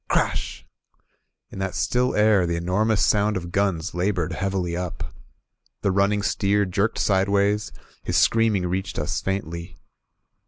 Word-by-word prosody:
Crash! - - -1 0.9
In - - -8
that 95 -1 -3
still 125 +1 +1
air, 105 -4 +4
the 85 - -1
enormous 100 +5 +1
sound 105 -1 +2
of 85 -1 -6
guns 95 -3 0
labored 90 -2 -1
heavily 95 -3 -2
up. 90 -1 -5 0.7
The 100 - +2
running 100 +1 +2
steer 100 0 +1
jerked 100 +4 0
sideways, 100 +1 +1 0.2
— - - -27
^his - - -1
screaming 110 -5 +3
reached 95 +2 -3
us - - -2
faintly. 85 -2 -4
100 Hz, 140 wpm, -24 LUFS, 90-105 Hz, 0.9 s, air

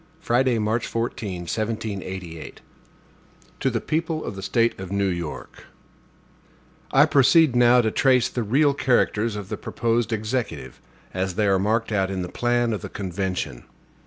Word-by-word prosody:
Friday, 125 -4 +2
March 110 +2 0
14, 110 -5 -3
1788. 95 -2 -4
HAMILTON 80 - -10 1.0
To - - +1
the - - -1
People 160 0 -2
of - - -5
the 95 - -7
State 115 +2 +1
of 95 -1 -7
New 100 0 +1
York: 85 -7 -5 1.3
I 135 +2 +6
PROCEED 145 -1 +4
now 120 0 +6
to 110 -2 0
trace 130 -1 +3
the 120 - -3
real 140 +7 +3
characters 115 -5 +1
of 100 -2 -6
the - - -3
proposed 115 0 -1
Executive, 110 +3 -3 0.3
as 95 -1 -2
they 105 - +1
are 95 -1 +3
marked 110 +4 0
out 95 -2 +1
in 95 -2 -3
the 90 - -6
plan 120 +1 0
of 105 - -4
the - - -7
convention. 95 -9 -4
110 Hz, 160 wpm, -24 LUFS, 95-120 Hz, 1.3 s, I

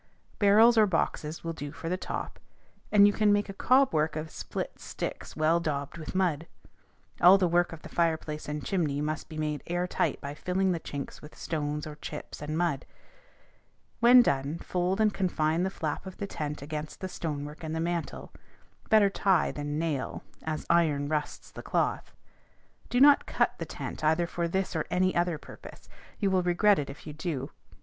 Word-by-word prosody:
Barrels 220 +3 +6
or 215 - +6
boxes 165 -3 -2
will 165 0 -3
do 145 -3 -6
for 165 - -8
the 180 - 0
top, 185 - -5 0.5
or 210 - +3
you 205 0 +7
can 210 -1 +3
make 205 0 +1
a - - -5
cob 255 +5 +3
work 155 0 +1
of 155 0 -5
split - - -5
sticks - - -6
well 160 +2 +3
daubed 145 -1 -3
with 155 - -7
mud. 170 -4 0 0.7
All 180 +3 +9
the 185 -2 +2
work 175 +1 +2
of 165 -1 -10
the - - -8
fireplace 160 -3 -1
and 150 0 -4
chimney 155 -8 0
must 155 +1 -3
be 155 - -8
made 150 -1 -2
air 175 +1 0
tight 180 - -1
by 140 0 -6
filling 185 +4 0
the 170 - -1
chinks 140 -3 -7
with 150 - -13
stones 150 -2 -3
or 150 -1 -8
chips 150 -1 -8
and 150 +1 -3
mud. 165 -6 -1 1.1
When 245 +1 +8
done, 140 - 0
fold 180 +3 -1
and 215 -2 +3
confine 165 -3 0
the 190 - +1
flap 160 -1 -4
of 190 - -9
the 200 - -3
tent 150 -6 -5
against 150 +1 -6
the 190 - -4
stonework 150 -3 -5
and 160 0 -3
the - - -2
mantle; 170 0 -3 0.6
better 210 -2 +5
tie 195 -2 +2
than 145 0 -4
nail, 155 -5 -2 0.2
as 155 -1 -4
iron 150 -4 +2
rusts 150 -1 -3
the - - -9
cloth. - - -1 0.8
Do 245 - +1
not 285 +1 +6
cut - - 0
the - - -3
tent - - -6
either 160 +3 +3
for 170 0 -2
this 190 +1 -2
or 160 - 0
any 185 +1 +1
other 175 -2 +1
purpose: - - -13 0.3
you 200 -3 +1
will 185 -1 +3
regret 180 +3 +3
it 140 - -4
if 140 - -10
you 150 - -7
do. 150 -3 -4
165 Hz, 190 wpm, -29 LUFS, 150-185 Hz, 1.1 s, All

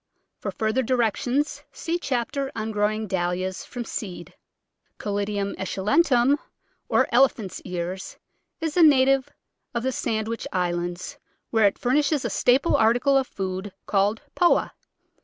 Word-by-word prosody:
For - - -4
further 220 +4 0
directions 255 +4 0
see 340 +1 -3
chapter 270 0 -2
on 220 0 -3
growing 215 +1 0
Dahlias 185 0 -2
from 245 -1 -6
seed. 180 -6 -6 0.6
Caladium 200 -1 -2
esculentum, 250 - +2 0.5
or - - +3
Elephant's 240 -7 +2
Ears, 180 +1 -5 0.4
is 320 -2 -2
a 355 - +4
na 285 -5 +7
tive 270 -1 +2 0.5
of 235 - -1
the 260 - +1
Sandwich 225 -1 -2
Islands, 175 +8 -2 0.3
where 220 -3 +5
it 200 - -1
furnishes 285 +3 +1
a - - -1
staple 260 +6 +3
article 245 +5 +3
of 265 -1 +3
food 190 0 -4
called 205 +2 +1
Poa. 350 - +3
225 Hz, 130 wpm, -25 LUFS, 195-270 Hz, 0.6 s, na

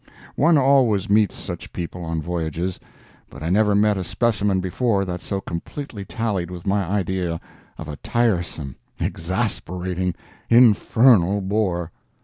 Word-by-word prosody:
One 160 +3 +4
always 130 -8 +3
meets 105 -2 +3
such - - -7
people 85 0 -5
on 80 -1 -3
voyages, 85 +1 -3 0.5
but 75 - -10
I 85 - -1
never 105 +1 +3
met 105 0 +3
a - - -2
specimen 105 0 +1
before 100 +2 0
that 90 -1 -4
so 100 - -3
completely 100 - -6
tallied 100 -7 -2
with 90 -1 -8
my 100 0 +1
idea 90 -2 -1 0.4
of - - -7
a 75 -1 -6
tiresome, 90 - -1 0.2
exasperating, 90 -1 -2 0.3
infernal 115 -4 +5
bore. 95 -4 -1
95 Hz, 130 wpm, -22 LUFS, 85-110 Hz, 0.5 s, infernal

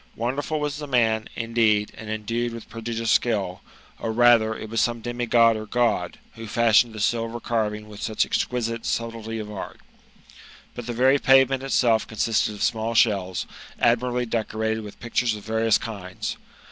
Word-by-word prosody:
Wonderful 135 +6 -2
was 150 0 -2
the 150 -1 -6
man, 110 -4 +1
in4eed» 115 -2 +1
and 110 - -9
endued 115 +2 -2
with 115 -1 -9
prodigious 115 0 -2
skill; 100 -6 +1 0.4
or, 115 - -2
rather, 115 -1 +4
it - - -7
was 115 +1 0
some 120 -1 -1
i^mi%od 120 -1 +3
or 110 0 -6
God, 115 -8 0 0.2
who 115 -1 -9
fashioned 115 +1 +3
the 110 - -7
silver 115 +2 -1
carving 105 -3 -2
with 105 -1 -11
such 110 -1 0
exquisite 115 -2 -2
subtility 115 -1 -3
pf 110 - -4
^ 105 0 -9
art. 95 - -7 0.9
But 120 -1 -8
the 120 - -3
very 130 +4 +4
pavement 135 0 +4
itself 120 -4 +2
ponsisted 110 -1 0
of 105 - -4
small 115 +1 0
shells, 95 -6 +2 0.3
adniir 120 +1 +3
ably 125 0 -1
decorated 110 -1 -2
with 105 -1 -10
pictures 120 -1 0
of 105 - -10
various 110 -1 +2
kinds. 100 -5 -6
115 Hz, 170 wpm, -24 LUFS, 110-120 Hz, 0.9 s, rather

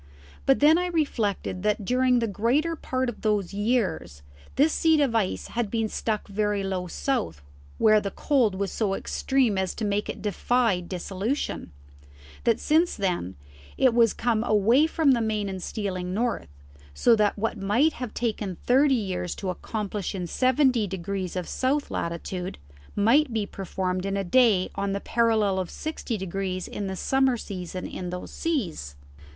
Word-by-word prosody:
But 270 0 +4
then 310 +3 +6
I 360 - 0
reflected 225 - -1
that 210 0 0
during 250 +2 +3
the 230 -1 +1
greater 250 - +1
part 260 -4 -2
of 240 - -5
those 210 -4 0
years 200 - -1 0.3
this 305 +3 +3
seat 320 -1 +3
of 275 -5 +2
ice 215 -5 -1
had 235 -3 -2
been 225 0 0
stuck 215 -1 -2
very 205 0 -1
low 185 -2 -2
south 85 - -2 0.3
where 215 -1 +5
the 200 - -3
cold 245 -5 +1
was 195 0 -2
so 200 -4 0
extreme 255 -6 0
as 190 -1 -2
to 220 - -3
make 205 0 -1
it - - -6
defy 220 0 +1
dissolution; 185 - -3 0.7
that 230 -1 +3
since 325 +3 +2
then, 180 - -2 0.4
it 255 -3 +4
was 230 -2 +5
come 230 -2 +1
away 230 +7 +4
from 320 -3 +3
the 240 -3 +3
main 215 -2 -1
and 190 -1 -5
stealing 185 -2 -3
north, 235 +1 -1 0.5
so 235 - +5
that 210 -1 +1
what 225 +1 -2
might 235 +11 +2
have 250 -4 -6
taken 210 -6 -2
thirty 270 +2 +4
years 185 -6 -2
to 190 -2 -3
accomplish 205 +1 -4
in 180 -2 -3
seventy 255 - +2
degrees 190 0 -4
of 180 -2 -3
south 275 +3 -1
latitude, 175 +2 -4 0.4
might 245 +8 +4
be 220 -2 -1
performed 185 -1 -3
in 195 0 -1
a 195 - -1
day 205 -2 +3
on 200 0 -2
the 200 - -1
parallel 220 -4 +2
of 185 - -3
sixty 310 -7 -4
degrees 190 -1 -3
in 200 - -4
the 190 - -3
summer 265 +4 +2
season 185 -4 -6
in 180 -1 -5
these 180 0 -6
seas. 180 - -3
210 Hz, 170 wpm, -26 LUFS, 190-250 Hz, 0.7 s, then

